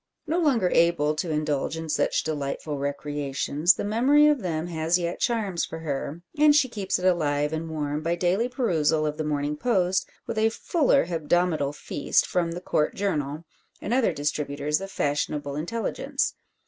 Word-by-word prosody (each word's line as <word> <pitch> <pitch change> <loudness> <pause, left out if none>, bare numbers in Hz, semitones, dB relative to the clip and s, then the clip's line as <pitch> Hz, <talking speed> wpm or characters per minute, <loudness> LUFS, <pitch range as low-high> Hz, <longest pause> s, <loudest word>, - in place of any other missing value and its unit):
No 330 +3 0
longer 250 - +2
able 165 -3 +3
to 160 +3 -3
indulge 150 0 -1
in 160 0 -5
such 150 - +1
delightful 145 -1 -3
recreations, 145 +2 0
the - - -4
memory 255 +8 +4
of 300 -2 +4
them 165 -3 -2
has 165 0 +1
yet 170 -1 -3
charms 205 -8 0
for 160 - -5
her, 155 +2 -4 0.2
and 300 -1 +6
she 280 -3 +4
keeps 200 -5 -2
it 180 - -4
alive 150 -4 +1
and 160 +1 -3
warm 150 -1 -2
by 165 +2 0
daily 185 +7 +1
perusal 160 - +1
of 150 0 -2
the 155 - -2
Morning 150 0 -1
Post 190 -2 +1 0.2
with 225 - -3
a 220 +1 +4
fuller 280 +4 +2
hebdomadal 165 -3 0
feast 145 - 0
from 170 -2 -1
the 175 - -6
Court 150 -4 0
Journal, 155 -5 -2 0.3
and 220 - -3
other 250 -6 +3
distributors 145 0 -1
of 195 - -6
fashionable 145 -3 -2
intelligence. 230 - -2
165 Hz, 170 wpm, -26 LUFS, 150-200 Hz, 0.3 s, and